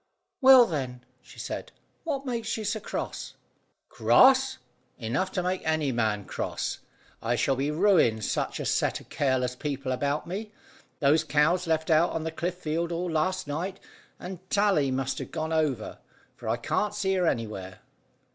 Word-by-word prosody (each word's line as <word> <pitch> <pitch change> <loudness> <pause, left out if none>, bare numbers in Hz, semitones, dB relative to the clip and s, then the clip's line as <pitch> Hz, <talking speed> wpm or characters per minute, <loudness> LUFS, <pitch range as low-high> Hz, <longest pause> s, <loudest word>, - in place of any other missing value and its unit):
"Well, 260 -2 +9
then," 130 - -4 0.2
she - - -16
said, - - -5 0.3
"what 280 -4 -2
makes 235 -3 -2
you 215 - -4
so 210 +2 -1
cross?" - - -5 0.5
"Cross! 265 0 +5 0.4
Enough 130 +12 -1
to 180 - -1
make 185 +1 -1
any 155 -3 +1
man 110 -4 0
cross. - - -3 0.4
I 120 +1 0
shall 135 +3 +1
be 135 +3 -1
ruined 150 - +3
such - - -2
a - - -3
set - - +1
of - - -17
careless 130 -3 0
people 140 -1 -3
about 140 +3 -1
me. 210 +5 -5 0.5
Those 150 +3 +4
cows 160 +5 +2
left 160 0 0
out 160 +2 +5
on 160 - -2
the 160 - -3
cliff 175 +2 -3
field 170 0 -2
all 175 +1 -2
last 185 +4 0
night, 175 +7 -4 0.4
and 180 -1 -7
Tally 195 -10 +3
must 130 0 -1
have - - -6
gone 160 +1 -3
over, 145 -9 -1 0.4
for 115 - -6
I 115 - +1
can't 205 - -1
see 195 -2 0
her 180 -2 +2
anywhere." 95 - -3
160 Hz, 165 wpm, -27 LUFS, 130-190 Hz, 0.5 s, Well